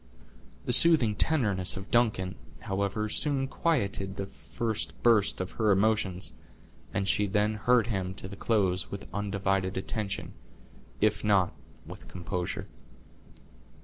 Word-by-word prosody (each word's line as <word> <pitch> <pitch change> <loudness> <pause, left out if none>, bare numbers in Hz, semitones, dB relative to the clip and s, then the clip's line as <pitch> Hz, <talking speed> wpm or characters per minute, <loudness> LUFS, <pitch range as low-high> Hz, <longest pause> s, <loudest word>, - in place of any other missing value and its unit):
The 125 - 0
soothing 150 -8 +7
tenderness 105 - +1
of 95 +1 -8
Duncan, 105 -6 +1 0.3
however, 100 +2 -2
soon 135 +4 +4
quieted 100 - -1
the 100 - -4
first 110 +3 -5
burst 110 -4 +3
of 95 0 -4
her 110 - +3
emotions, 95 -2 +1 0.6
and 100 0 -2
she 105 0 +2
then 105 +2 +1
heard 115 +2 +2
him 95 -5 -3
to 95 - -8
the 100 - -9
close 95 -4 0
with 100 0 -7
undivided 100 -2 -1
attention, 100 +1 -4 0.7
if 105 0 +1
not 100 -4 +2 0.3
with - - -11
composure. 90 0 -4
100 Hz, 125 wpm, -28 LUFS, 95-110 Hz, 0.7 s, soothing